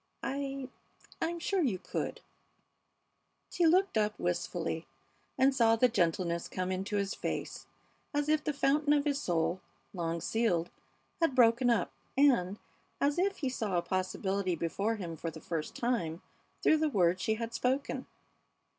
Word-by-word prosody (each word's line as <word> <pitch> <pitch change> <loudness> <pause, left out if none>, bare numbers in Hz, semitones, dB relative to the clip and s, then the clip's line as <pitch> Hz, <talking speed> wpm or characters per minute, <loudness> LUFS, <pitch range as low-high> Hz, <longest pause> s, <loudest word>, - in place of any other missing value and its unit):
I 275 -1 -3 0.5
I'm 335 +1 -1
sure 380 +3 0
you 240 - +1
could - - -4 0.7
" - - -47
She 345 - +3
looked 365 - +3
up 210 0 0
wistfully 170 -2 -2 0.5
and 270 +1 +4
saw 230 -3 +4
the 250 +2 +4
gentleness 170 -4 0
come 185 0 -3
into 190 +3 -2
his 200 -1 0
face - - -4 0.4
as 290 0 0
if 305 0 +2
the 305 - 0
fountain 290 +1 +2
of 290 0 +2
his 285 -1 0
soul, 175 +1 0 0.3
long 170 -2 -2
sealed, 175 -4 0 0.5
had 330 -6 +2
broken 240 0 +5
up, 225 -7 +2 0.3
and 225 -9 +4 0.4
as 285 +4 +2
if 390 +1 +1
he 270 - -1
saw 215 -7 -1
a 170 - +1
possibility 185 0 -1
before 195 +7 -1
him 170 -6 -6
for 165 - -3
the 160 0 -9
first 160 -1 -4
time 195 -10 -1 0.4
through 315 - +5
the 310 0 +1
words 185 -6 +2
she 220 -1 +1
had 230 +1 -5
spoken. 265 +3 -1
225 Hz, 155 wpm, -31 LUFS, 180-280 Hz, 0.7 s, broken